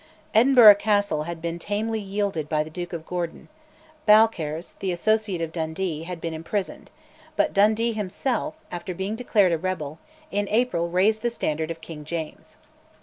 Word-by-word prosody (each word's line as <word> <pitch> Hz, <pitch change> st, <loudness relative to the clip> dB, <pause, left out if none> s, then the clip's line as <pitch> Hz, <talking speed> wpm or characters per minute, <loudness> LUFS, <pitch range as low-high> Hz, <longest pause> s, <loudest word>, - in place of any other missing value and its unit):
Edinburgh 235 Hz, -1 st, +8 dB
Castle 205 Hz, -8 st, +1 dB
had 170 Hz, -1 st, -6 dB
been 170 Hz, 0 st, -3 dB
tamely 220 Hz, +4 st, -2 dB
yielded 195 Hz, -6 st, -2 dB
by 150 Hz, -1 st, +1 dB
the 155 Hz, -, -11 dB
Duke 175 Hz, +1 st, -6 dB
of 165 Hz, -2 st, -6 dB
Gordon; 175 Hz, -2 st, -5 dB, 0.6 s
Balcarres, 185 Hz, -7 st, +3 dB
the 190 Hz, -, -1 dB
associate 210 Hz, 0 st, 0 dB
of 165 Hz, -1 st, -3 dB
Dundee, 160 Hz, 0 st, -3 dB
had 180 Hz, -1 st, -6 dB
been 165 Hz, 0 st, -4 dB
imprisoned; 165 Hz, +5 st, -4 dB, 0.5 s
but -, -, +1 dB
Dundee 215 Hz, +3 st, +3 dB
himself, 220 Hz, +9 st, -2 dB, 0.2 s
after 175 Hz, +1 st, -5 dB
being 190 Hz, +4 st, -3 dB
declared 215 Hz, -6 st, +2 dB
a 165 Hz, -, 0 dB
rebel, 160 Hz, -4 st, -4 dB, 0.3 s
in 205 Hz, 0 st, -1 dB
April 215 Hz, -7 st, +1 dB
raised 200 Hz, +5 st, +2 dB
the 240 Hz, -, +1 dB
standard 160 Hz, -8 st, -2 dB
of 165 Hz, -1 st, -6 dB
King 160 Hz, -2 st, -9 dB
James. 160 Hz, 0 st, -6 dB
185 Hz, 160 wpm, -24 LUFS, 165-215 Hz, 0.6 s, Edinburgh